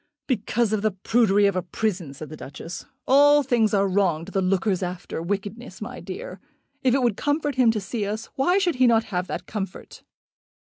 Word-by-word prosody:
"Because 230 -2 0
of 215 - +1
the 215 - +2
prudery 205 +1 +3
of 200 -2 +2
a 185 - +1
prison," 180 -3 -2
said 155 +1 -8
the 155 - -8
Duchess. 155 +4 -8 0.2
"All 290 +2 +6
things 235 -5 +2
are 200 -1 +3
wrong 180 -4 +1
to 195 - -10
the 195 - 0
lookers 190 +1 +1
after 180 -2 -4
wickedness, 200 +3 -4
my 235 +4 -7
dear. 185 -1 -7 0.4
If 255 -2 +3
it 270 - +1
would 235 -5 +2
comfort 290 +2 0
him 255 -3 +4
to 225 -1 +1
see 205 +1 -3
us, 215 +2 -3
why 325 +7 +2
should 360 -8 +1
he 255 0 +5
not 225 -1 +4
have 180 +1 -1
that - - -5
comfort?" 195 -3 -6
210 Hz, 205 wpm, -24 LUFS, 185-245 Hz, 0.4 s, All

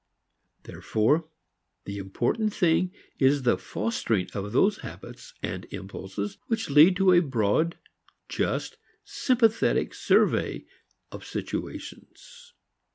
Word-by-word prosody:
Therefore 150 +9 0 0.6
the 100 0 -5
important 120 - -1
thing 180 0 +2 0.3
is 135 0 +3
the 120 -5 +3
fostering 105 0 -2
of 100 0 -4
those 195 - +3
habits - - -10
and - - -4
impulses 100 +1 -6
which 225 -9 -2
lead 155 +6 +7
to 190 0 +4
a 175 - +7
broad, 135 - 0 0.5
just, - - -2 0.3
sympathetic 230 -4 +1
survey - - +1 0.5
of - - -9
situations. 485 -1 -7
145 Hz, 100 wpm, -26 LUFS, -, 0.6 s, lead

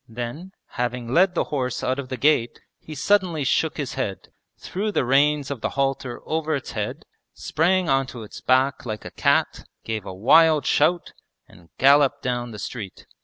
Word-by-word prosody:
Then, 120 +11 -6 0.3
having 125 0 -3
led 180 +2 +4
the - - +2
horse 130 -3 -2
out 130 +2 -1
of 130 -2 -6
the 130 - -4
gate, 140 -5 +2 0.2
he 155 - -10
suddenly 175 -1 +1
shook 155 +4 0
his 145 -4 -4
head, 105 -9 -4 0.3
threw 210 +3 -3
the 165 - 0
reins 140 +2 +2
of 135 -5 -5
the - - -1
halter 135 -2 -1
over 160 -1 -1
its 135 - -5
head, - - -4 0.3
sprang 180 +3 +1
onto 135 -4 -1
its 105 - -11
back 130 +1 +2
like 110 -3 -6
a - - -7
cat, - - +1 0.2
gave 110 -2 -4
a 95 - -7
wild 150 - +4
shout, 170 +4 +1 0.3
and 85 -1 -19
galloped 140 +1 +4
down 120 -1 -2
the 110 - -9
street. 105 -2 -7
135 Hz, 175 wpm, -23 LUFS, 120-155 Hz, 0.3 s, led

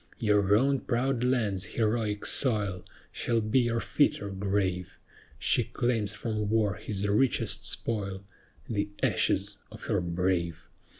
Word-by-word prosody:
Your 105 -2 +3
own 135 +3 +2
proud 125 0 -1
land's 110 -7 0
heroic 110 -2 0
soil 105 -8 +3 0.3
Shall 115 -1 0
be 110 +4 +1
your 120 -1 0
fitter 110 -7 0
grave; 95 -2 -2 0.4
She - - +3
claims 115 -4 -1
from 105 -3 -3
war 110 -2 +2
his 105 +1 -4
richest 115 +6 +1
spoil 100 -4 -1 0.4
The 105 -2 -2
ashes - - +1
of - - -11
her - - 0
brave. 85 -1 -2
105 Hz, 125 wpm, -28 LUFS, 95-115 Hz, 0.4 s, Your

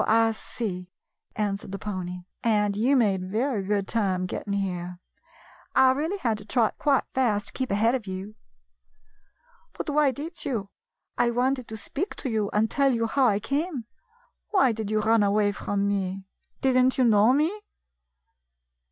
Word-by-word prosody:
"So - - 0
I 225 +1 +4
see," 190 -5 -5 0.5
answered 200 -2 -2
the 195 - -4
pony, 180 -3 -5 0.2
"and 210 -3 +2
you 245 +7 +3
made 205 -7 +2
very 230 +2 0
good 200 0 -1
time 190 -5 0
getting 200 +2 -4
here. 180 -3 -3 0.8
I 260 0 +6
really 315 +9 -1
had 230 - -1
to 205 - -12
trot 230 -1 +1
quite 280 -3 +3
fast 220 -6 +1
to - - -14
keep 260 -1 -3
ahead 220 +4 +2
of 245 -6 -3
you." 190 +3 -6 1.4
"But - - -4
why 295 -1 +4
did 305 +7 -6
you? 225 -9 -3 0.5
I 240 -1 +4
wanted 255 +1 0
to 220 - -7
speak 300 - -4
to 260 - -4
you 215 -2 0
and 215 +1 +2
to - - -9
tell 275 -1 +4
you 230 -2 0
how 260 +3 +3
I 205 -3 +2
came. 280 - -2 0.6
Why 365 - +4
did 220 -2 -4
you 215 0 +1
run 225 +1 +3
away 205 0 +3
from 200 0 -2
me? 195 -1 -2 0.4
Did 265 -1 +2
n't 255 +1 +3
you 260 - +4
know 220 0 +5
me 320 +10 +1
220 Hz, 175 wpm, -26 LUFS, 200-260 Hz, 1.4 s, I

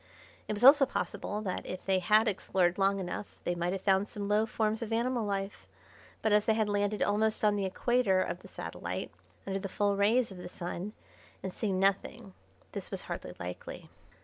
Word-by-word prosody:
It - - -1
was 210 +3 -2
also 275 +1 +9
possible 205 -4 -3
that 185 -3 -3
if 185 - -7
they 190 -1 +3
had 215 +5 +4
explored 185 -2 +1
long 195 0 +3
enough 185 +2 -5
they 175 - 0
might 175 0 -1
have 190 0 -4
found 195 0 +3
some 205 -1 -5
low 210 +2 +2
forms 220 0 0
of 230 -1 -4
animal 235 +1 +1
life, 195 0 -3 0.6
but 220 - +2
as 210 0 +4
they 220 - +3
had 220 -1 +1
landed 205 0 +1
almost 215 +1 +1
on 210 -1 +4
the 200 -1 0
equator 200 0 +2
of 180 -1 -1
the - - -13
satellite, - - -5 0.3
under 195 0 -2
the 195 0 -5
full 205 +1 +1
rays 220 +4 +3
of 185 - -9
the 180 - -7
Sun, 180 +3 -5 0.5
and 190 - -4
seen 195 -4 -1
nothing, 195 +2 0 0.4
this - - -6
was - - -4
hardly - - -6
likely. 90 +1 -7
205 Hz, 200 wpm, -31 LUFS, 190-215 Hz, 0.6 s, also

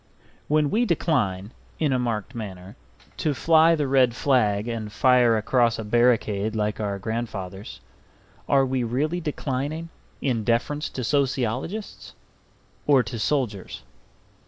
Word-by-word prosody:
When 150 -1 +2
we 230 +3 +2
decline 105 - 0 0.3
(in 150 -4 +1
a 130 - +1
marked 115 -1 -2
manner) 95 -4 -8 0.4
to 150 -2 0
fly 165 +3 +5
the 150 -3 -1
red 130 -3 +3
flag 110 -6 +1
and 110 -3 -4
fire 125 -1 +4
across 115 +1 +2
a 110 - -4
barricade 110 -2 +1
like 105 0 -1
our 100 -2 -2
grandfathers, 100 -3 -5 0.7
are 135 -1 +4
we 130 -1 -1
really 150 +9 -1
declining 150 +1 -3 0.3
in 120 -5 -1
deference 125 +7 0
to 130 - -5
sociologists 140 - -2 0.7
or 140 -4 +5
to 120 -2 -6
soldiers? 110 -7 -2
125 Hz, 130 wpm, -24 LUFS, 110-145 Hz, 0.7 s, fly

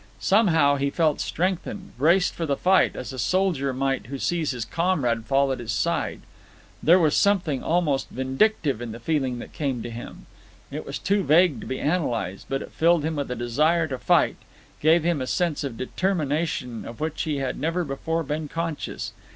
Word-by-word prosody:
Somehow 165 -9 +4
he 140 +1 0
felt 155 0 +1
strengthened, 185 +2 -2
braced 170 +9 +3
for 165 - -3
the 140 -1 0
fight, 190 +1 +3
as - - -6
a 130 - -6
soldier 180 -7 +1
might 135 -1 -1
who 140 +2 -5
sees 165 +2 -1
his 125 -4 -3
comrade 125 -7 0
fall 135 +1 +2
at 130 - -2
his 120 -2 -4
side. 110 - -1 0.6
There 170 +3 +6
was 160 -5 +3
something 180 -9 +2
almost 160 -5 0
vindictive 135 - 0
in 120 -2 -5
the 115 - -8
feeling 130 -2 -1
that - - -9
came 135 -6 -2
to 120 - -6
him. 115 +1 -9 0.5
It - - -6
was - - -4
too 200 +1 +1
vague 155 - +4
to - - -8
be 130 - -3
analysed, 120 - -1
but 135 0 -1
it - - -11
filled 165 -1 +3
him 160 -1 -2
with 140 -2 -2
a 125 - -2
desire 150 +8 +2
to 130 -2 -4
fight, - - +3 0.4
gave 160 +2 +4
him 170 -4 +1
a 130 - -3
sense 170 -2 0
of 130 -5 -4
determination 150 - -1
of 115 - -9
which 155 0 -2
he 155 -3 -1
had 135 -2 -3
never 165 +5 0
before 160 +3 -2
been 150 +1 -3
conscious. 165 0 -4
150 Hz, 190 wpm, -25 LUFS, 130-170 Hz, 0.6 s, There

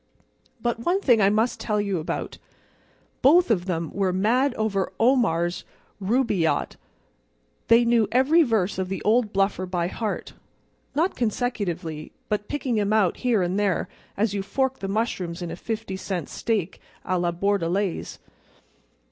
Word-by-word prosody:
But 235 0 -1
one 350 +11 +1
thing 245 - +4
I 195 - +5
must 220 +4 +1
tell 210 -2 -1
you 200 -3 -1
about. 155 - -4 0.8
Both 325 +1 +5
of 180 -5 +1
them 165 -4 -2
were 195 -2 +1
mad 240 +8 +2
over 205 -3 -1
Omar's 205 -9 +2 0.4
Rubaiyat. 205 -5 +1 0.9
They 230 +1 +6
knew 235 -2 +3
every 265 +7 +4
verse 215 - +1
of 185 -1 -2
the 195 - -4
old 220 0 +2
bluffer 195 -2 0
by 175 -1 -1
heart—not 275 - -5
consecutively, 195 -10 -2 0.2
but 210 0 -1
picking 260 -6 -1
'em 205 0 +1
out 205 -5 +2
here 235 -7 +1
and 180 +3 -1
there 200 -3 0 0.3
as 205 0 +1
you 200 - -1
fork 265 +6 -1
the 195 - -4
mushrooms 190 -5 -2
in 170 - -5
a - - -4
fifty 220 -4 -4
cent 185 -5 -4
steak 205 -6 -2 0.2
à 185 -1 0
la 175 -1 +1
Bordelaise. 195 0 -1
205 Hz, 145 wpm, -24 LUFS, 185-235 Hz, 0.9 s, They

